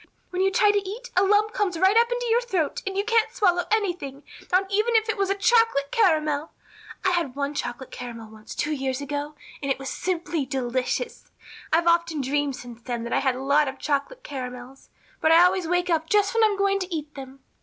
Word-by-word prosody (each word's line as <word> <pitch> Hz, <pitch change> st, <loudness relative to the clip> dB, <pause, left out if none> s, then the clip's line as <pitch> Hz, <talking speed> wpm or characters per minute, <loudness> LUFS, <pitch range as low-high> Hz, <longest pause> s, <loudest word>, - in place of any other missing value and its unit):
When 365 Hz, 0 st, -1 dB
you 385 Hz, -, +4 dB
try 410 Hz, +2 st, +4 dB
to 410 Hz, -, +2 dB
eat 480 Hz, +4 st, -8 dB
a 365 Hz, -, +5 dB
lump 415 Hz, +2 st, +3 dB
comes 380 Hz, -5 st, -1 dB
right 380 Hz, +4 st, +4 dB
up 470 Hz, +1 st, +4 dB
in 485 Hz, -, +1 dB
your 470 Hz, +1 st, +4 dB
throat 375 Hz, -11 st, -1 dB
and 385 Hz, 0 st, -3 dB
you 400 Hz, -, +1 dB
can't 455 Hz, 0 st, +2 dB
swallow 360 Hz, -7 st, +2 dB
anything, 355 Hz, -10 st, -1 dB, 0.3 s
not 370 Hz, +2 st, +3 dB
even 435 Hz, +4 st, +1 dB
if 440 Hz, 0 st, +3 dB
it 440 Hz, -, 0 dB
was 395 Hz, -1 st, 0 dB
a 395 Hz, -, +1 dB
chocolate 400 Hz, -, +3 dB
caramel. 310 Hz, -7 st, +2 dB, 0.5 s
I 375 Hz, -, +4 dB
had 335 Hz, -8 st, -1 dB
one 280 Hz, +1 st, -2 dB
chocolate 245 Hz, -2 st, -5 dB
caramel 230 Hz, -3 st, -8 dB
once 215 Hz, -1 st, -11 dB
two 300 Hz, -, -1 dB
years 265 Hz, -3 st, -2 dB
ago 290 Hz, +1 st, -4 dB, 0.3 s
and 280 Hz, -, -3 dB
it -, -, 0 dB
was 270 Hz, 0 st, -6 dB
simply 345 Hz, -4 st, -2 dB
delicious. 260 Hz, -, -3 dB, 0.4 s
I've 330 Hz, +1 st, +3 dB
often 335 Hz, -2 st, +2 dB
dreamed 280 Hz, +1 st, -1 dB
since 240 Hz, -2 st, -11 dB
then 240 Hz, -1 st, -4 dB
that 235 Hz, -, -4 dB
I -, -, +3 dB
had 265 Hz, -2 st, +1 dB
a 260 Hz, -, -6 dB
lot 285 Hz, +2 st, +3 dB
of 265 Hz, 0 st, -5 dB
chocolate 300 Hz, -, -2 dB
caramels, 255 Hz, -1 st, -8 dB, 0.3 s
but 315 Hz, -, +3 dB
I 335 Hz, +2 st, +8 dB
always 360 Hz, -1 st, +2 dB
wake 355 Hz, +1 st, 0 dB
up 320 Hz, -1 st, 0 dB
just 410 Hz, 0 st, +3 dB
when 455 Hz, -1 st, +3 dB
I'm 420 Hz, -2 st, +3 dB
going 395 Hz, 0 st, +2 dB
to 370 Hz, -1 st, -5 dB
eat 305 Hz, -2 st, -4 dB
them. 270 Hz, -1 st, -10 dB
330 Hz, 220 wpm, -25 LUFS, 275-395 Hz, 0.5 s, I